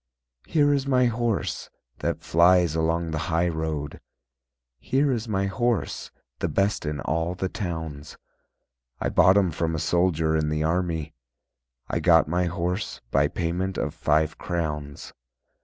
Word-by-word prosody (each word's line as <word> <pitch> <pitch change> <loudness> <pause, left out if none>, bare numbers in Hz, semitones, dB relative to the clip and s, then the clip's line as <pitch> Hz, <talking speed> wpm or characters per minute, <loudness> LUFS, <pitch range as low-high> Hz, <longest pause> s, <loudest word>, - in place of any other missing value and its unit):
"Here 145 -2 +3
is 140 -1 -1
my 130 -2 +3
horse 120 -2 -1 0.3
That - - -2
flies 85 -1 +4
along 80 +1 0
the 80 - -2
high 85 +1 +2
road, 80 -3 -4 0.8
Here 135 - +1
is 120 -2 -2
my 100 -2 0
horse, 105 - -1 0.3
The - - 0
best 100 -5 0
in 75 -1 -3
all 80 +4 -1
the 95 - -2
towns. 80 -7 -5 0.8
I - - -1
bought 95 +4 +5
him 95 -4 +3
from 80 +1 -1
A - - -2
soldier 80 -1 +1
in 75 -1 +1
the 75 0 -1
army, 80 -2 -1 0.7
I - - -1
got - - +5
my 90 +3 +1
horse 90 +3 -3
By 70 +1 +3
payment 90 +4 -2
of - - -2
five 80 +1 +1
crowns." 75 -5 -4
85 Hz, 145 wpm, -25 LUFS, 80-95 Hz, 0.8 s, bought